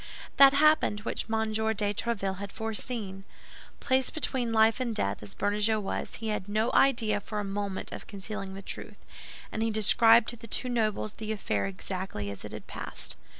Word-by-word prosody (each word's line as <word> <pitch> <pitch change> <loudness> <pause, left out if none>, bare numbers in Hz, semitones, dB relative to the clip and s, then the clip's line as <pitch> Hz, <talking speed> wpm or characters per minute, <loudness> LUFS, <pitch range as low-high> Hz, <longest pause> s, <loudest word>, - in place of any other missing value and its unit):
That 275 0 +9
happened 305 -7 +4
which 225 - -4
M. 220 -1 0
de 220 -1 +1
Tréville 200 -4 -2
had 200 0 -6
foreseen. 220 -3 -3 0.6
Placed 260 +1 +1
between 260 -6 -1
life 220 +1 +4
and 240 -3 -1
death, 100 - -1
as 105 -1 -10
Bernajoux 210 +2 +1
was, 200 - -4
he 225 0 -4
had 210 -2 -3
no 215 +3 +1
idea 225 -6 +4
for 210 +1 -4
a - - -1
moment 200 -1 -3
of - - -8
concealing 195 -1 -6
the 195 - -8
truth; - - -7 0.5
and 220 - -3
he 225 - +2
described 225 +2 +5
to 240 - -4
the 230 0 -11
two 250 +3 0
nobles 215 -3 0
the 220 0 -5
affair 105 - -1
exactly 105 - -4
as 100 - -9
it - - -7
had - - -8
passed. - - -6
215 Hz, 185 wpm, -29 LUFS, 200-230 Hz, 0.6 s, That